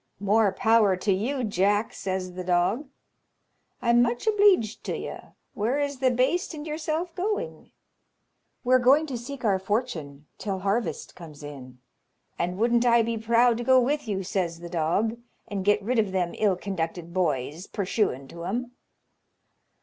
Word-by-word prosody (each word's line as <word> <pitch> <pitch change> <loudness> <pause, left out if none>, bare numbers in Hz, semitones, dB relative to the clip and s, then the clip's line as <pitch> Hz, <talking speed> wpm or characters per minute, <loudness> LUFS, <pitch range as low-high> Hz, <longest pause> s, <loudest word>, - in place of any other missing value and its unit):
"More 205 +1 +3
power 220 -1 +3
to 195 +2 +1
you, 250 +8 -1
Jack," 205 +1 +1
says 185 -1 -3
the 185 0 -5
dog. 180 +10 +1 1.0
"I'm 235 0 +5
much 240 - 0
obleeged 400 - +3
to - - -2
you: - - -6 0.3
where 230 +7 0
is 285 -2 -2
the 260 -1 +3
baste 265 +8 0
and 295 0 -7
yourself 315 +2 -3
going?" 420 +6 -3 0.9
"We're 255 0 +4
going 275 +5 +5
to 275 -5 -5
seek 255 +1 -7
our 195 -3 +3
fortune 185 - -3
till 195 -3 -2
harvest 200 +5 -2
comes 155 -4 -11
in." 130 -4 -9 0.6
"And 180 +1 -1
wouldn't 235 +2 +3
I 235 -1 +5
be 230 +1 -1
proud 230 +1 +3
to - - -2
go 260 +1 +5
with 280 +2 0
you!" 195 -2 -2
says 175 -3 -2
the 170 0 -8
dog, 180 +8 0 0.3
"and 200 -2 -3
get 205 +1 +2
rid 240 +3 +1
of 210 -3 +1
them 180 -2 -1
ill 205 -3 +3
conducted 170 -2 -4
boys; 155 -1 -1
purshuin' 190 - -1
to 170 0 -8
'em." 240 +6 -3
215 Hz, 160 wpm, -26 LUFS, 185-250 Hz, 1.0 s, I'm